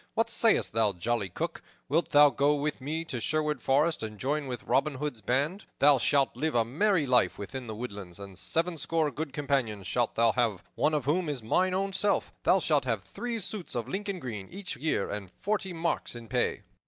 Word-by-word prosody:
What - - +1
sayst - - +3
thou, 110 -3 +2
jolly 105 +2 -1
Cook, - - -4 0.3
wilt 160 +5 +1
thou 145 0 +7
go 145 +2 +3
with 145 -1 -2
me 160 +5 -3
to 130 -6 -3
Sherwood 150 +2 0
Forest 150 +6 +2
and 110 -1 -5
join 145 +4 -1
with 125 -3 -5
Robin 145 +1 +1
Hood's 140 -4 -4
band? 145 - 0
Thou 140 -1 +6
shalt 140 +1 +2
live 160 -2 -1
a 115 -1 +4
merry 165 - +2
life 125 -2 +3
within 125 +5 -6
the 110 - -5
woodlands, 100 -6 -7
and 100 -1 -10
sevenscore 165 - 0
good 155 -2 -4
companions 135 -8 -1
shalt 120 +5 0
thou 115 0 +4
have, 110 -5 0
one 155 - +1
of 150 - -1
whom 160 +3 +1
is 135 -6 -4
mine 185 +11 +2
own 195 +1 -1
self. 200 +2 +1
Thou - - +4
shalt - - +2
have - - -1
three 240 -1 -4
suits 195 -2 -5
of 120 -1 -2
Lincoln 195 +5 -3
green 105 - -5
each 195 0 -5
year, 130 -5 0
and 100 -2 -5
forty 205 -2 -1
marks 170 -6 -2
in 120 -1 -9
pay." 120 -3 0
140 Hz, 205 wpm, -29 LUFS, 115-160 Hz, 0.3 s, thou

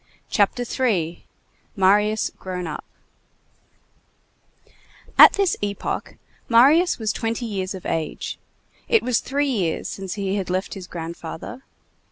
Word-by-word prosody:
CHAPTER 210 +4 +2
III—MARIUS 210 -1 0
GROWN 180 -1 -5
UP 155 - -5 2.3
At - - +10
this 395 -3 +2
epoch, 205 0 -3 0.3
Marius 285 +10 +5
was 220 -2 -1
twenty 230 +1 -2
years 195 -3 -3
of 185 - -10
age. 160 -2 -3 0.5
It 455 - +3
was 250 -2 +2
three 285 +2 -1
years 185 -9 -1
since 195 -2 -5
he 200 -1 -1
had 190 -2 -3
left 185 +1 -2
his 190 -3 -8
grandfather. 170 +7 -7
205 Hz, 115 wpm, -23 LUFS, 185-240 Hz, 2.3 s, At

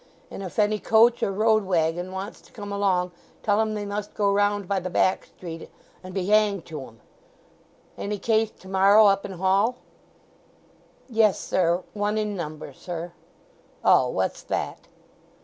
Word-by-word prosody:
And - - -7
if 185 -3 -7
any 210 0 +2
coach 230 +3 +4
or - - +1
road 215 +2 +3
waggon 175 0 0
wants 190 +3 -6
to - - -21
come 205 -2 -8
along, 190 -3 +1 0.3
tell 205 0 +3
'em 215 -1 -1
they 205 -1 -3
must 205 +1 -5
go 200 -1 +2
round 205 -1 +1
by 195 0 0
the 185 0 -5
back 185 +1 +1
street, 165 -2 -9 0.3
and 185 - -8
be 185 -1 -2
hanged 205 -3 +2
to 155 -3 -7
'em.... 115 0 -19 1.0
Any 205 +1 -3
case 220 +1 +1
tomorrow 195 +2 +4
up 195 -1 +3
in 195 - -6
Hall?" 195 +6 +2 1.3
"Yes, 220 -5 +3
sir. 175 0 +1
One 210 +1 -1
in 210 -1 -1
number, 155 -5 -6
sir." 170 +4 -6 0.7
"Oh, 130 - +5
what's 95 -5 -2
that?" - - -4
200 Hz, 160 wpm, -25 LUFS, 180-210 Hz, 1.3 s, Oh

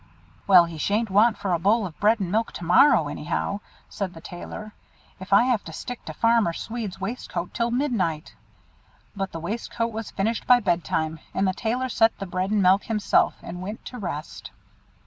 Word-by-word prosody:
"Well, 180 -3 +8
he 165 -2 -8
sha'n't 210 +5 0
want 215 +4 +4
for 190 -3 -1
a 170 - +1
bowl 205 +5 +2
of 165 -4 -9
bread 215 +2 +3
and 185 -3 -3
milk 225 +2 0
to - - -7
morrow, 175 - +5
anyhow," 150 +7 -3 0.3
said 190 -4 -5
the - - -9
Tailor, 210 +5 -8 0.5
"if 190 +1 -10
I 200 +4 +7
have 245 -4 +1
to 160 - -8
stick 245 +8 -7
to - - -6
Farmer 230 -7 +3
Swede's 220 0 -5
waistcoat 190 -4 -4
till 235 0 0
midnight." 225 - -1 0.8
But 195 -1 -3
the 165 - -6
waistcoat 230 +5 -3
was 225 0 -5
finished 220 +3 -2
by 250 -1 +7
bed 175 -6 0
time, 160 0 -2 0.2
and 195 0 +2
the 185 - +1
Tailor 240 +5 -1
set 225 -2 +2
the 195 - -5
bread 185 +1 -2
and 210 -2 +2
milk 190 +2 +4
himself, 215 -2 +2
and 180 +1 -7
went 210 +5 -7
to 250 - -7
rest. 165 -6 -6
200 Hz, 195 wpm, -25 LUFS, 175-230 Hz, 0.8 s, Well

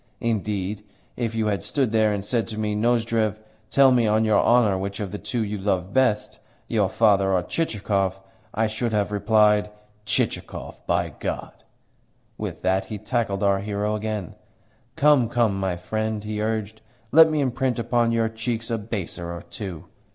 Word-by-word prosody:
Indeed, 105 -3 -2 0.3
if 115 -2 -2
you 110 -1 0
had 100 -2 0
stood 135 -6 0
there 110 -1 +3
and 100 -1 -3
said 115 +1 0
to 110 -2 -6
me, 105 -1 -1
'Nozdrev, 115 -1 +1 0.3
tell 135 +2 +5
me 120 -3 +3
on 110 +1 +3
your 105 -2 +4
honour 115 -5 +4
which 100 +1 -4
of 100 -3 -4
the 105 - -5
two 120 -3 -2
you 105 -1 -4
love 95 -1 -1
best 125 -5 +1 0.3
your 105 -4 +1
father 100 -4 +3
or 90 -1 +2
Chichikov?' 100 - -1 0.3
I 110 +2 +1
should 110 +1 -2
have 105 -1 +1
replied, 105 0 +3 0.4
'Chichikov, - - -2
by - - +1
God!'" - - -6 0.7
With - - -6
that 95 +1 +1
he 105 +2 -6
tackled 105 -2 -1
our 100 -1 +3
hero 105 +1 -2
again, 105 -4 -4 0.6
"Come, 145 -6 +4
come, 115 -5 +1
my 95 -2 -1
friend!" 110 +3 -3
he 105 0 -3
urged. 110 0 -2 0.3
"Let 160 +1 +8
me 155 -1 0
imprint 130 -2 0
upon 120 0 +1
your 115 -1 +2
cheeks 115 +1 -4
a 115 - 0
baiser 95 -5 -5
or 85 0 -7
two. 90 -6 -6
110 Hz, 170 wpm, -24 LUFS, 100-115 Hz, 0.7 s, Let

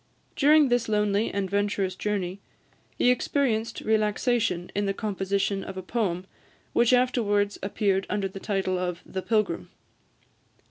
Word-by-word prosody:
During 300 -1 +5
this 245 -2 +1
lonely 210 0 +1
and 200 -1 -1
venturous 200 -1 0
journey 195 -2 -2 0.6
he 250 - +4
experienced 235 -4 0
relaxation 215 -3 +1
in 205 0 0
the 195 - -1
composition 195 -1 -1
of 195 - -7
a 185 - -5
poem, 185 -4 -1 0.5
which 235 0 +4
afterwards 215 -5 +2
appeared 195 -1 0
under 205 -2 0
the 195 +1 -9
title 190 -3 -1
of 180 -1 -3
"The 190 - -4
Pilgrim." 215 -5 0
205 Hz, 135 wpm, -26 LUFS, 195-225 Hz, 0.6 s, During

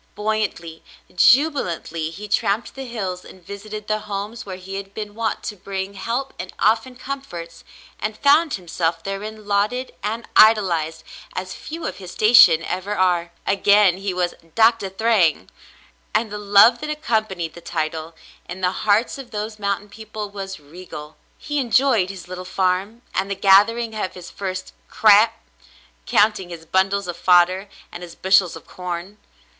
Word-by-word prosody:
Buoyantly, 210 -6 -3 0.3
jubilantly, 180 - +2
he 200 +6 -8
tramped 205 +1 0
the 270 -1 -7
hills 190 -6 -4
and 185 -2 -15
visited 210 +2 -8
the 215 0 0
homes 210 +2 -6
where 190 - -5
he 190 +1 -7
had 195 0 -8
been 210 -1 -6
wont 225 0 -2
to 210 - -5
bring 195 0 -5
help 235 +7 -3
and 180 +1 -6
often 225 +4 +1
comforts, 245 -12 -7 0.4
and 215 0 -3
found 295 +2 +4
himself 165 -2 -2
therein 210 +3 -6
lauded 210 +6 0
and 225 +3 -4
idolized 170 -8 +4 0.3
as 185 0 -4
few 320 - -7
of - - -4
his 185 -3 -9
station 215 -7 +6
ever 185 +4 -3
are. 175 -2 +1
" - - -38
Again 200 -2 +4
he 195 0 -3
was 180 -1 -1 0.2
"Doctah 225 -3 +4
Thryng," 190 - +1 0.7
and 215 0 +1
the 210 - -5
love 205 +4 +6
that 300 - -5
accompanied 215 - -2
the 170 - -12
title, 160 0 -4 0.3
in 180 +2 -7
the 180 0 +2
hearts 215 +7 +1
of 260 -3 -9
those 215 -1 -5
mountain 200 0 -2
people, 215 -1 -7
was 195 -2 -6
regal. 150 0 -11 0.2
He 295 -1 -3
enjoyed 240 -5 +2
his 190 -2 -9
little 185 0 -7
farm, 190 +5 -1
and 190 +1 -1
the 200 - -2
gathering 215 +4 +4
of 210 -3 -4
his 180 -1 -10
first 185 -1 -5
"crap," 215 +1 +5 0.7
counting 205 -3 +2
his 165 -2 -9
bundles 190 +3 +1
of 175 -1 -5
fodder 185 +3 +3 0.2
and 175 - -8
his 175 -1 -10
bushels 190 -2 +3
of - - -11
corn. 180 +3 -6
200 Hz, 160 wpm, -21 LUFS, 180-220 Hz, 0.7 s, station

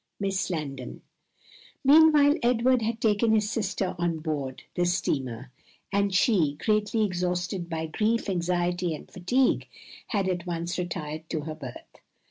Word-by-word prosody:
Miss 195 -1 -1
Landon. 140 -7 -5 0.8
Meanwhile 295 0 +6
Edward 245 +1 +3
had 225 +1 -2
taken 220 0 +2
his 210 0 +1
sister 200 -3 -2
on 170 -1 0
board 150 -5 -4
the 175 - 0
steamer, 130 - -2 0.4
and 200 0 +2
she, 185 - +3
greatly 215 +5 +1
exhausted 180 -1 -2
by 160 -1 -2
grief, 215 +8 0
anxiety, 175 -2 0
and - - -12
fatigue, 245 +8 +1 0.4
had 200 -4 0
at 180 -1 -2
once 170 +1 -3
retired 155 -2 -5
to 155 - -2
her 155 +1 -5
berth. 135 -6 -10
180 Hz, 135 wpm, -27 LUFS, 160-215 Hz, 0.8 s, Meanwhile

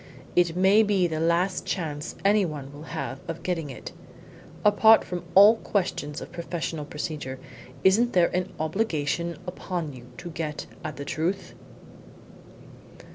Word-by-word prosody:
It 175 -2 +3
may 190 +4 +5
be 200 -4 +2
the 160 -2 -1
last 170 +3 +1
chance 155 -3 -3
anyone 160 -9 +1
will 150 +2 -10
have 140 -5 -4
of 165 -1 -5
getting 165 -5 -2
it. 130 - -8 0.7
Apart 220 +2 +7
from 180 -1 -5
all 205 +4 +9
questions 160 -8 -2
of - - -8
professional 170 -3 -4
procedure, 150 -4 -5 0.5
isn't 225 +6 +4
there 175 -1 +3
an 180 0 -1
obligation 165 -1 -1
upon 175 -4 -4
you 125 -1 -12
to 175 -1 -7
get 155 -2 -4 0.2
at 155 -2 -4
the 140 - -6
truth?" 165 +6 -2
170 Hz, 135 wpm, -26 LUFS, 150-190 Hz, 0.7 s, all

